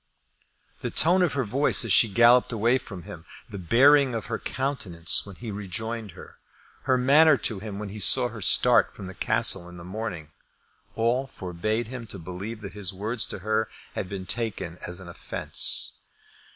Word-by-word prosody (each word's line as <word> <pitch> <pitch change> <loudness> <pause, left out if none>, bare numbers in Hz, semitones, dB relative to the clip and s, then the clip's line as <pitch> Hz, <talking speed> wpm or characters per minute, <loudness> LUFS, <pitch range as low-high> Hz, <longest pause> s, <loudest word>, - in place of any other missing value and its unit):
The - - -4
tone 180 +3 +3
of 180 - +1
her 140 -2 0
voice 125 +3 +2
as 105 - +2
she 115 - +6
galloped 120 +4 +4
away 115 +3 +1
from 95 -8 -10
him, 80 0 -10 0.2
the 100 - -8
bearing 130 - +4
of 115 - -4
her - - -2
countenance 100 -12 0
when 100 - -10
he 115 +1 -8
rejoined 105 +1 -5
her, - - -14 0.5
her 130 -1 +2
manner 145 +4 +5
to 110 -4 -1
him 100 -1 -7
when 105 0 -6
he 105 +2 -8
saw 125 +5 +6
her 110 -2 -10
start - - +4
from 100 - -10
the 95 - -8
Castle 110 -5 +1
in 90 - -12
the 85 - -10
morning, 90 -5 -6 0.6
all 120 +4 0
forbade 110 +4 -4
him 125 -3 -8
to 100 - -5
believe 95 +6 -7
that 100 -2 -8
his 100 -2 -3
words 110 +4 -1
to - - -6
her 110 +1 0 0.2
had 90 - -5
been 95 -2 -6
taken 100 -6 -4
as 90 +1 -7
an 95 - -11
offence. 85 - -3
110 Hz, 185 wpm, -25 LUFS, 95-120 Hz, 0.6 s, she